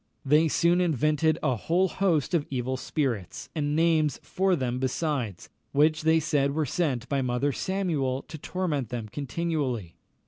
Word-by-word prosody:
They 150 +4 +4
soon 170 +3 +3
invented 155 -1 +2
a 130 - +2
whole 175 - +1
host 180 -4 0
of 160 -4 +1
evil 130 0 -2
spirits, 130 - -3
and 150 -2 -1
names 160 -3 +2
for 190 0 +1
them 125 -4 -2
besides, 130 - -2 0.3
which 155 +2 +3
they 160 +1 +4
said 145 -3 +1
were 155 -1 +1
sent 135 -4 -1
by 140 -1 0
Mother 125 +3 0
Samuel 150 -7 -1
to 155 - -9
torment 150 - -2
them 115 -3 -5
continually. 140 - -2
150 Hz, 150 wpm, -27 LUFS, 130-165 Hz, 0.3 s, They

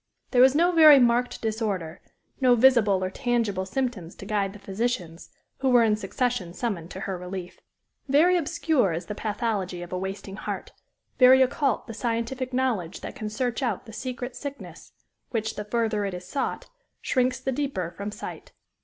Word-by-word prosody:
There 250 - +5
was 265 +2 +6
no 345 +3 +4
very 310 -4 +9
marked 245 -1 +2
disorder, 210 -7 -2 0.4
no 255 -2 +5
visible 225 -6 +4
or 185 - -2
tangible 225 -6 -1
symptoms 210 -7 -3
to - - -10
guide 200 -1 0
the - - -10
physicians, 195 -4 -3 0.3
who 265 - +1
were 245 -2 +6
in 215 -2 +3
succession 210 -3 -2
summoned 190 -9 -3
to 190 - -8
her 190 -2 -4
relief. 180 0 -7 0.5
Very 315 +7 +5
obscure 320 - +1
is 165 +3 -4
the 210 - -5
pathology 205 -4 -2
of 175 - -9
a 180 - -1
wasting 195 +1 -6
heart, - - -5 0.5
very 260 +1 +8
occult 265 -1 0
the 225 - -8
scientific 235 +3 -2
knowledge 245 -10 -1
that - - -6
can 215 -5 -5
search 240 +3 -2
out 235 -7 -2
the 225 - -11
secret 250 +1 -5
sickness, 285 -1 -8 0.4
which, 220 -2 -2
the 210 - -5
further 220 -1 0
it 195 -2 -3
is 180 0 -9
sought, 275 +8 -3 0.3
shrinks 255 -1 0
the 265 +1 -2
deeper 255 - -2
from 200 +4 -6
sight. - - -9
225 Hz, 175 wpm, -26 LUFS, 195-255 Hz, 0.5 s, very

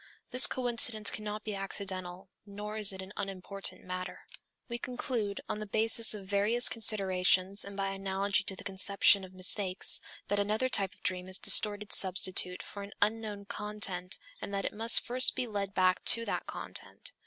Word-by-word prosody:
This 255 +1 +8
coincidence 235 -3 +1
cannot 210 0 -7
be 215 - -6
accidental, 190 -1 -6
nor 205 +1 -9
is 210 -2 +7
it 190 0 -8
an 190 +2 -13
unimportant 195 0 -6
matter. 185 0 -8 0.5
We 235 -1 -6
conclude, 240 -5 -5
on 210 - -5
the 215 - -8
basis 225 +2 +3
of 200 -2 -10
various 205 +5 +3
considerations 195 -2 +1
and 200 0 -11
by 195 0 -3
analogy 195 +1 -2
to 195 - -2
the - - -12
conception 200 0 +3
of 185 0 -13
mistakes, 185 0 +2 0.3
that 205 - -2
another 215 +5 -2
type 195 -6 -1
of - - -27
dream 180 0 -2
is 185 0 +3
a - - -9
distorted 210 -1 +5
substitute 185 -1 +3
for 200 - -10
an 200 0 -11
unknown 210 -1 -3
content 200 -3 -2 0.2
and - - -7
that 195 - -4
it - - -4
must 225 +2 +2
first 255 +1 +2
be 255 - -2
led 200 -3 -6
back 185 0 +1
to 230 -1 +4
that - - -5
content. - - -7
200 Hz, 175 wpm, -29 LUFS, 190-215 Hz, 0.5 s, This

